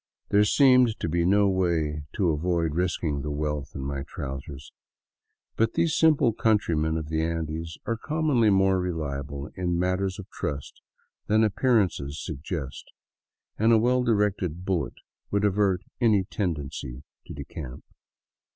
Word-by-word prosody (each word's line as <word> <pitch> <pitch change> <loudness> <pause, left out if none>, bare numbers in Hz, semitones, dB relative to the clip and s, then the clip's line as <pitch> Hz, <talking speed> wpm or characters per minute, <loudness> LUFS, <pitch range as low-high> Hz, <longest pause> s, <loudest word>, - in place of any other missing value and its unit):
There 105 +1 +5
seemed 125 0 +4
to - - -2
be 85 +1 +1
no 100 +1 +4
way 80 -6 0
to 95 -6 +1
avoid 85 0 0
risking 80 -4 -1
the 75 - -4
wealth 75 -1 -3
in - - -4
my 70 0 -3
trousers 70 -2 -7 0.4
,* - - -55
but 115 0 +1
these 165 -2 +2
simple 150 -7 +4
countrymen 85 -9 +1
of 80 -2 -4
the 80 0 0
Andes 80 0 -3
are 115 - -1
commonly 150 -5 +1
more 95 -1 +3
reliable 75 -5 -4
in 90 -2 -1
matters 90 +1 0
of 100 - -9
trust 70 -1 -5 0.5
than 110 +1 +4
appearances 100 - +1
suggest, 75 -2 -5 0.7
and 110 +2 +4
a 115 - +7
well 125 +3 +3
directed 100 -7 0
bullet 85 -9 -1 0.3
would 100 0 +1
avert 100 -2 +2 0.2
any 105 -5 +4
tendency 75 - -4 0.2
to - - -8
decamp. 65 -5 -8
90 Hz, 140 wpm, -26 LUFS, 75-105 Hz, 0.7 s, a